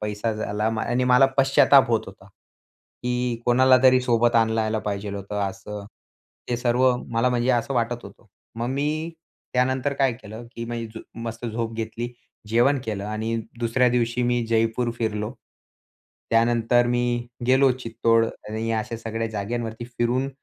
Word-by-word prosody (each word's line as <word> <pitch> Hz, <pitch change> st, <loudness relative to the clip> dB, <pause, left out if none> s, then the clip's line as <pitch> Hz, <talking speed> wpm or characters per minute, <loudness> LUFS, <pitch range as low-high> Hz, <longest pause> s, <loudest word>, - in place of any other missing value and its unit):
पैसा 105 Hz, +1 st, -2 dB
झाला 105 Hz, -1 st, -3 dB, 0.2 s
आणि 125 Hz, +2 st, 0 dB
मला 125 Hz, +2 st, +6 dB
पश्चाताप 135 Hz, 0 st, +5 dB
होत 115 Hz, -2 st, +3 dB
होता. 95 Hz, 0 st, -13 dB, 0.8 s
की 125 Hz, -1 st, -1 dB
कोणालातरी 130 Hz, +1 st, +5 dB
सोबत 120 Hz, -1 st, +2 dB
आणलं 110 Hz, 0 st, +3 dB
यायला 110 Hz, 0 st, 0 dB
पाहिजेल 100 Hz, 0 st, -3 dB
होतं 100 Hz, +1 st, -4 dB
असं. 105 Hz, +1 st, -8 dB, 0.7 s
हे 120 Hz, -, +1 dB
सर्व 125 Hz, +1 st, +3 dB
मला 115 Hz, +1 st, +1 dB
म्हणजे 125 Hz, +1 st, +1 dB
असं 125 Hz, +2 st, 0 dB
वाटत 120 Hz, 0 st, -1 dB
होतं. -, -, -14 dB, 0.3 s
मग 115 Hz, +1 st, -2 dB
मी 150 Hz, +5 st, -1 dB, 0.4 s
त्यानंतर 130 Hz, +2 st, +1 dB
काय 135 Hz, -2 st, +2 dB
केलं, 115 Hz, 0 st, -10 dB
की 115 Hz, -, -4 dB
म्हणजे 115 Hz, -1 st, -6 dB, 0.2 s
मस्त 115 Hz, +1 st, -5 dB
झोप 115 Hz, 0 st, -3 dB
घेतली 120 Hz, +2 st, -4 dB, 0.4 s
जेवण 120 Hz, +5 st, +3 dB
केलं 105 Hz, -3 st, -3 dB
आणि 110 Hz, +2 st, -2 dB, 0.2 s
दुसऱ्या 120 Hz, +2 st, +3 dB
दिवशी 120 Hz, 0 st, 0 dB
मी 120 Hz, -1 st, +1 dB
जयपूर 115 Hz, +1 st, +1 dB
फिरलो. 105 Hz, -1 st, -2 dB, 1.0 s
त्यानंतर 120 Hz, +1 st, +3 dB
मी 120 Hz, 0 st, 0 dB, 0.2 s
गेलो 130 Hz, +1 st, +5 dB
चित्तोड 115 Hz, -1 st, +2 dB, 0.2 s
आणि 110 Hz, +1 st, -3 dB
अशा 110 Hz, +1 st, -2 dB
सगळ्या 115 Hz, 0 st, -3 dB
जागांवरती 110 Hz, +2 st, -4 dB
फिरून, 125 Hz, +2 st, -1 dB
120 Hz, 145 wpm, -24 LUFS, 110-125 Hz, 1.0 s, मला